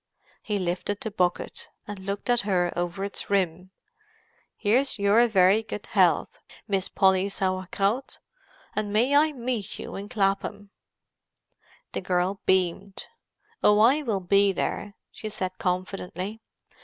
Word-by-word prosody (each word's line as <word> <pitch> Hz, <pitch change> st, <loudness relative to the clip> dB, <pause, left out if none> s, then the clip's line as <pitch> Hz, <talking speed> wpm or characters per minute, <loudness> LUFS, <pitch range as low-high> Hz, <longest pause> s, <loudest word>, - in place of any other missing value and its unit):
He 210 Hz, -2 st, -2 dB
lifted 185 Hz, +2 st, -2 dB
the 220 Hz, -, -4 dB
bucket, 180 Hz, -3 st, -1 dB, 0.2 s
and 205 Hz, -1 st, -7 dB
looked 200 Hz, +1 st, -5 dB
at 240 Hz, -1 st, +3 dB
her 180 Hz, -4 st, +1 dB
over 175 Hz, +2 st, -2 dB
its 200 Hz, -, -4 dB
rim. 185 Hz, -2 st, 0 dB, 0.9 s
"Here's 245 Hz, +6 st, +2 dB
your 205 Hz, +4 st, +4 dB
very 195 Hz, 0 st, +4 dB
good 215 Hz, -1 st, -7 dB
health, -, -, +2 dB, 0.3 s
Miss 195 Hz, -3 st, 0 dB
Polly 190 Hz, 0 st, +3 dB
Sauer 185 Hz, -1 st, -2 dB
Kraut, 210 Hz, +7 st, -1 dB, 0.6 s
and 210 Hz, -1 st, -2 dB
may 240 Hz, +7 st, +3 dB
I 305 Hz, +2 st, +5 dB
meet 245 Hz, -6 st, -3 dB
you -, -, -7 dB
in 200 Hz, +1 st, -6 dB
Clapham!" 200 Hz, -1 st, -1 dB, 1.2 s
The -, -, -3 dB
girl 185 Hz, +1 st, 0 dB
beamed. 190 Hz, +1 st, 0 dB, 0.6 s
"Oh, 210 Hz, -, +6 dB
I 255 Hz, +8 st, +5 dB
will 220 Hz, -9 st, -1 dB
be 200 Hz, +2 st, +4 dB
there," 200 Hz, +1 st, -3 dB, 0.2 s
she 215 Hz, -, -7 dB
said 185 Hz, -3 st, -4 dB
confidently. 185 Hz, +2 st, -3 dB
200 Hz, 135 wpm, -26 LUFS, 185-215 Hz, 1.2 s, Oh